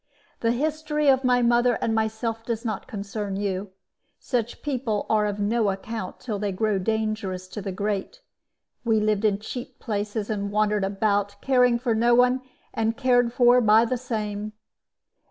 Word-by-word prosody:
"The 230 - +1
history 300 +2 0
of 265 0 +4
my 250 -1 +3
mother 240 0 +3
and 225 - 0
myself 220 +1 -1
does 230 0 -3
not 215 -4 -3
concern 205 -3 -4
you. 195 0 -2 0.5
Such 240 -2 -3
people 245 -7 -1
are 210 -1 +3
of 205 0 -3
no 215 +1 +1
account 195 0 -4
until 215 -5 -3
they 205 -1 -1
grow 205 +1 0
dangerous 215 -3 -2
to 210 - -6
the 195 0 -4
great. 205 - -3 0.6
We 225 -2 +2
lived 215 0 +1
in 205 -2 +3
cheap 240 +4 -7
places 210 0 -3
and 200 -1 -2
wandered 210 0 +1
about, 200 0 0
caring 250 -2 +3
for 235 -1 0
no 235 +2 +4
one, 250 +1 +4 0.3
and 225 0 0
cared 245 -3 +3
for 245 0 +5
by 220 +1 +5
the 255 - -1
same. 215 -4 -4
220 Hz, 165 wpm, -25 LUFS, 205-240 Hz, 0.6 s, for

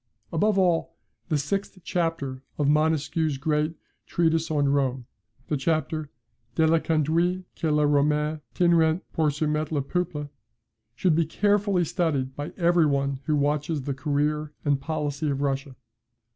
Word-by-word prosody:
Above 205 +5 +2
all, 175 -3 +2 0.3
the 155 - +2
sixth 195 +8 -2
chapter 165 -7 -2 0.2
of 145 - +1
Montesquieu's 155 0 +1
great 150 +3 0 0.3
Treatise 165 -1 +1
on 145 -2 +2
Rome, 135 -3 0 0.4
the 150 - -1
chapter 155 +1 -1 0.5
"DE 160 - +4
LA 165 +1 +4
CONDUITE 165 +4 +1
QUE 160 - -1
LES 150 0 +3
ROMAINS 150 +1 +2 0.2
TINRENT 170 -1 +3
POUR 155 -2 +2
SOUMETTRE 150 +1 -1
LES 140 - +1
PEUPLES," 165 -5 -2 0.7
should 170 +6 +2
be 165 0 +2
carefully 200 0 +2
studied 155 -6 -1
by 145 +1 -5
every 170 -3 +4
one 140 -1 0
who 155 - +1
watches 145 +1 0
the 140 - -2
career 150 +2 -1
and 140 -2 +2
policy 150 -1 -2
of 140 -1 -1
Russia. 135 -1 -2
155 Hz, 145 wpm, -26 LUFS, 145-165 Hz, 0.7 s, DE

